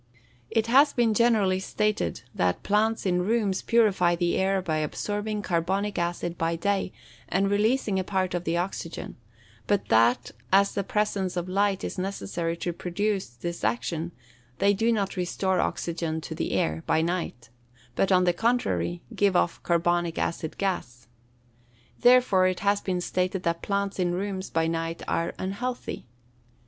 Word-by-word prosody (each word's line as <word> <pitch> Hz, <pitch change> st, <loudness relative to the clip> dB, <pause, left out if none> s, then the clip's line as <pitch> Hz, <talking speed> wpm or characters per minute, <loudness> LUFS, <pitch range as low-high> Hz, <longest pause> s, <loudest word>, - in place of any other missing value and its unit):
It 225 Hz, -1 st, +1 dB
has 275 Hz, +5 st, +5 dB
been 235 Hz, -3 st, +2 dB
generally 210 Hz, -5 st, +3 dB
stated 210 Hz, +2 st, -1 dB
that 90 Hz, -1 st, 0 dB
plants 215 Hz, +2 st, +1 dB
in 180 Hz, -1 st, +2 dB
rooms 205 Hz, -1 st, +1 dB
purify 195 Hz, -7 st, +3 dB
the 175 Hz, 0 st, 0 dB
air 190 Hz, 0 st, +2 dB
by 165 Hz, -4 st, -1 dB
absorbing 205 Hz, +7 st, -2 dB
carbonic 190 Hz, +4 st, 0 dB
acid 175 Hz, 0 st, -2 dB
by 165 Hz, +1 st, +1 dB
day, 195 Hz, +2 st, 0 dB, 0.4 s
and 195 Hz, +2 st, +1 dB
releasing 210 Hz, -1 st, +2 dB
a -, -, -1 dB
part 185 Hz, -1 st, -1 dB
of 175 Hz, -1 st, -2 dB
the 170 Hz, 0 st, 0 dB
oxygen; 175 Hz, -2 st, -4 dB, 0.5 s
but 205 Hz, -1 st, 0 dB
that, 115 Hz, +2 st, +3 dB, 0.2 s
as 200 Hz, +1 st, +4 dB
the 200 Hz, -, -1 dB
presence 195 Hz, -3 st, -1 dB
of 175 Hz, 0 st, -2 dB
light 195 Hz, +1 st, +1 dB
is -, -, -4 dB
necessary 175 Hz, -3 st, -3 dB
to 175 Hz, 0 st, -3 dB
produce 195 Hz, +4 st, -1 dB
this 170 Hz, +9 st, -6 dB
action, 125 Hz, +10 st, -1 dB, 0.5 s
they 200 Hz, +6 st, +4 dB
do 225 Hz, +4 st, +2 dB
not 200 Hz, -4 st, -1 dB
restore 185 Hz, +1 st, 0 dB
oxygen 165 Hz, -1 st, -2 dB
to -, -, -6 dB
the -, -, -3 dB
air, 80 Hz, +1 st, 0 dB
by 160 Hz, -, +3 dB
night, 165 Hz, -9 st, -3 dB, 0.5 s
but, 195 Hz, -, +1 dB
on 185 Hz, -1 st, +5 dB
the 175 Hz, -1 st, +3 dB
contrary, 225 Hz, -5 st, 0 dB
give 200 Hz, -3 st, +2 dB
off 175 Hz, -, +1 dB
carbonic 170 Hz, 0 st, +1 dB
acid 160 Hz, -2 st, -2 dB
gas. 125 Hz, -, -3 dB, 0.9 s
Therefore 245 Hz, -7 st, +5 dB
it 185 Hz, -1 st, -2 dB
has 200 Hz, 0 st, +2 dB
been 180 Hz, -2 st, -1 dB
stated 185 Hz, +1 st, -1 dB
that 170 Hz, 0 st, -1 dB
plants 200 Hz, -1 st, -2 dB
in 175 Hz, -1 st, +1 dB
rooms 190 Hz, 0 st, -3 dB
by 165 Hz, 0 st, +1 dB
night 165 Hz, 0 st, -2 dB
are 165 Hz, -, -1 dB
unhealthy. 220 Hz, -, -4 dB
185 Hz, 155 wpm, -26 LUFS, 170-205 Hz, 0.9 s, has